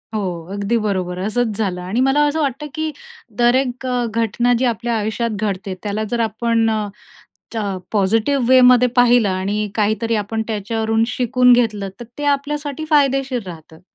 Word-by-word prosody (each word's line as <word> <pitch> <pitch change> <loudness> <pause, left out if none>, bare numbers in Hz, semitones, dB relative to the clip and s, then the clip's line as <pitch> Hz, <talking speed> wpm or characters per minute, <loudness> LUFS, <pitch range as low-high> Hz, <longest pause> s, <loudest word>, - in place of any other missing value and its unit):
हो, - - 0 0.3
अगदी 205 +3 0
बरोबर! 185 -3 -2
असंच 215 +2 -1
झालं 190 -5 -2
आणि 185 +6 -2
मला 270 +3 +3
असं 310 +2 -1
वाटतं 280 +1 -2
की 315 0 -2 0.5
तर 240 +1 +4
एक 260 -1 -1 0.3
घटना 230 +2 +1
जी 260 - +1
आपल्या 235 0 -1
आयुष्यात 220 +2 -2
घडते, 195 -2 -3
त्याला 210 +1 -2
जर 240 - 0
आपण 225 +1 0 0.9
अ, 215 -2 -1 0.2
पॉझिटिव्ह 225 +6 +1
वेमध्ये 250 -1 +6
पाहिलं 245 -3 +4
आणि 200 +3 -1
काहीतरी 220 +2 0
आपण 215 +1 -2
त्याच्यावरून 220 +1 -1
शिकून 250 0 +3
घेतलं, 215 -5 +1
तर 240 - -7
ते 290 - -5
आपल्यासाठी 290 +1 -1
फायदेशीर 270 -4 +2
राहतं. 160 -2 -11
230 Hz, 150 wpm, -19 LUFS, 210-250 Hz, 0.9 s, वेमध्ये